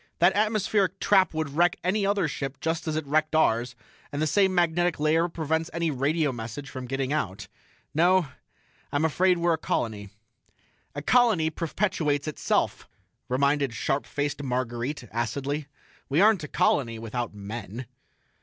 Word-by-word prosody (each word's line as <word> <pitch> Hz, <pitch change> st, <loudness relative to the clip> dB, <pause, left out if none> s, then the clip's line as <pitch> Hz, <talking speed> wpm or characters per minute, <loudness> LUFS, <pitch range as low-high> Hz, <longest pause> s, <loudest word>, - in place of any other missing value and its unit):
"That 175 Hz, +3 st, +4 dB
atmospheric 205 Hz, -3 st, +1 dB
trap 190 Hz, -2 st, +4 dB
would 155 Hz, -3 st, -2 dB
wreck 175 Hz, +4 st, +3 dB
any 195 Hz, +3 st, +1 dB
other 200 Hz, -4 st, +1 dB
ship 135 Hz, -2 st, -5 dB
just 165 Hz, +1 st, -2 dB
as 155 Hz, -, -1 dB
it 155 Hz, -1 st, -2 dB
wrecked 155 Hz, +2 st, +1 dB
ours, 120 Hz, -5 st, +2 dB, 0.4 s
and 145 Hz, -, -4 dB
the 155 Hz, -, +2 dB
same 190 Hz, +3 st, +3 dB
magnetic 175 Hz, -1 st, +2 dB
layer 160 Hz, +3 st, +2 dB
prevents 160 Hz, 0 st, -1 dB
any 170 Hz, -1 st, 0 dB
radio 145 Hz, +3 st, +1 dB
message 120 Hz, +4 st, -7 dB
from 130 Hz, -2 st, -6 dB
getting 135 Hz, +1 st, -1 dB
out. 105 Hz, -8 st, -3 dB, 0.5 s
No, 180 Hz, +3 st, +4 dB, 0.7 s
I'm 145 Hz, +3 st, +1 dB
afraid 180 Hz, +3 st, +3 dB
we're 170 Hz, 0 st, +2 dB
a 160 Hz, -, -2 dB
colony." 105 Hz, -8 st, -2 dB, 0.9 s
"A 145 Hz, -, -4 dB
colony 220 Hz, -8 st, +3 dB
perpetuates 160 Hz, -4 st, -1 dB
itself," 155 Hz, -, -1 dB, 0.4 s
reminded 140 Hz, -1 st, +1 dB
sharp 135 Hz, +6 st, -1 dB
faced 145 Hz, 0 st, -2 dB
Marguerite, 125 Hz, +1 st, -2 dB
acidly. 135 Hz, +6 st, -2 dB, 0.4 s
"We 140 Hz, +4 st, +2 dB
aren't 205 Hz, -3 st, +5 dB
a -, -, -4 dB
colony, 115 Hz, -5 st, +1 dB
without 115 Hz, 0 st, -4 dB
men." 105 Hz, +3 st, -6 dB
150 Hz, 150 wpm, -26 LUFS, 130-170 Hz, 0.9 s, aren't